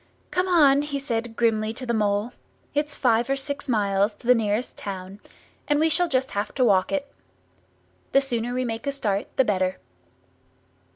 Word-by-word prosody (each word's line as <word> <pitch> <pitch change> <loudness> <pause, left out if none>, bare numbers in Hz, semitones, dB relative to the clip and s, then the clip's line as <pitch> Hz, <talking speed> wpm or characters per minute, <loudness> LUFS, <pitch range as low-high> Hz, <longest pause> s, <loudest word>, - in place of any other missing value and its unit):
"Come 365 +1 0
on!" 290 -6 +5
he 290 -1 -3
said 235 -4 -3
grimly 220 -1 +1
to 255 - -6
the 235 - -1
Mole. 210 +1 0 0.4
"It's 295 0 -1
five 235 -1 +2
or 275 - +2
six 280 0 -5
miles 205 -2 +1
to - - -19
the 250 - +7
nearest 220 0 -1
town, 190 0 -7 0.5
and 295 0 +2
we 320 +1 +3
shall 345 +3 +3
just 265 -3 0
have 205 +1 -3
to 255 - +3
walk 190 -4 +3
it. 285 -1 -3 1.0
The 275 - +5
sooner 245 -3 -2
we 255 0 0
make 230 +3 -4
a - - +2
start 210 -8 -1
the 265 - +4
better." 185 -3 0
240 Hz, 180 wpm, -24 LUFS, 210-280 Hz, 1.0 s, the